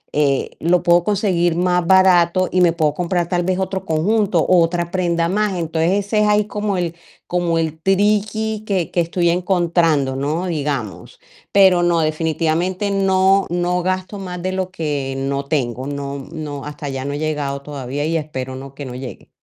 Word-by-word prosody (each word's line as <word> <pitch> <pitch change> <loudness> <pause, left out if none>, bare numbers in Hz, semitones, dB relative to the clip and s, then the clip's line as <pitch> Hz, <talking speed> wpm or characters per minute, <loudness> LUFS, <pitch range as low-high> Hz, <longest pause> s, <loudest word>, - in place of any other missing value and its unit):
eh, 140 -2 +1
lo 175 +2 +2
puedo 175 0 +4
conseguir 185 -5 +1
más 180 -1 +1
barato, 185 -1 +4
y 185 - +2
me 170 -2 +4
puedo 155 -3 +1
comprar 175 0 -1
tal 175 0 0
vez 185 +1 0
otro 190 0 -3
conjunto, 195 +4 +1
o 180 -2 +4
otra 170 +1 0
prenda 170 -2 0
más. 210 0 0
Entonces, 165 +2 0
ese 210 +1 0
es 210 - +3
ahí 210 0 +3
como 205 -2 -2
el 170 -1 -2 0.3
como 175 -2 0
el 160 -1 -2
triqui 210 +3 +1
que 185 -6 -1
que 175 - +1
estoy 170 0 +1
encontrando, 170 -6 +1
¿no?, 150 +6 -2
digamos. 145 - -4 0.3
Pero 190 -3 +5
no, 170 -1 +2
definitivamente 165 +5 -1
no 195 0 +3
no 175 +1 0
gasto 185 +2 -3
más 180 -2 -6
de 185 - -1
lo 185 -1 -2
que 145 -6 -3
no 140 +1 -2
tengo, 130 -3 -2
no 140 -1 -4
no 150 -3 -6
hasta 150 0 -7
allá 135 -1 -4
no 140 +1 -3
he - - -3
llegado 145 -3 -2
todavía 145 0 -4
y, 165 +1 -1
espero 130 -4 -5
no 135 +1 -9
que 140 0 -7
no 125 - -7
llegue. 130 0 -8
170 Hz, 180 wpm, -19 LUFS, 150-185 Hz, 0.3 s, Pero